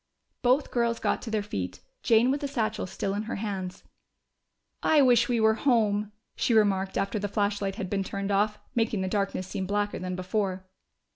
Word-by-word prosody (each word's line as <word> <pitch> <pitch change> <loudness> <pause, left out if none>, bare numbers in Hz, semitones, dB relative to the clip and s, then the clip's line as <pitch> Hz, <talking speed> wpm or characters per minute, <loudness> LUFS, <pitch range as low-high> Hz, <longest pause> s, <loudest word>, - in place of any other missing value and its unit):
Both 255 +3 +2
girls 235 -1 +1
got - - 0
to 230 - -6
their 215 -2 0
feet, 95 - -4 0.2
Jane 235 +3 +4
with 280 - -1
the 285 - -1
satchel 220 -7 -2
still 195 +2 -3
in 205 - -1
her - - -2
hands. 195 -3 -4 1.0
"I 300 -3 +5
wish 245 -2 +4
we 240 -2 +2
were 220 0 +5
home," 215 -4 +1 0.2
she 235 - +1
remarked 195 -3 +2
after 200 +2 -1
the 205 - -2
flashlight 200 -1 -1
had 190 - -4
been 195 +1 -1
turned 200 +1 -3
off, 210 +2 +2 0.2
making 225 -4 0
the 190 - -1
darkness 195 -1 -1
seem 190 0 -4
blacker 205 +1 -1
than 185 0 -3
before. 185 0 -2
205 Hz, 190 wpm, -27 LUFS, 195-225 Hz, 1.0 s, I